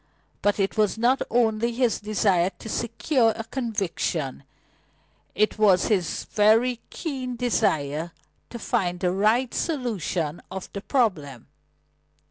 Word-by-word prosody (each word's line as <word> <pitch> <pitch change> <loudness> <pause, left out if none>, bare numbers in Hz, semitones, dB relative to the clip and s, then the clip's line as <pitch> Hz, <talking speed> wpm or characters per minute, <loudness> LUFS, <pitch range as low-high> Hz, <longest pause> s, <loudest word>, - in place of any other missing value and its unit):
But 205 +1 +1
it 195 +2 0
was 215 0 +2
not 245 +4 +3
his - - -4
only 235 0 +2
desire 210 -6 +1
to - - -10
secure 230 +1 +1
a 225 - -5
conviction; 200 - -3 0.9
it 215 +1 +1
was 195 -3 +4
his 190 -6 0
very 225 +4 +3
keen 260 -6 -4
desire 165 - 0 0.4
to 235 - -7
find 180 -5 -1
the 180 0 +1
right 220 +6 +2
solution 195 - -2
of 190 -1 -7
the 200 - -5
problem. 175 - -1
215 Hz, 120 wpm, -25 LUFS, 180-240 Hz, 0.9 s, was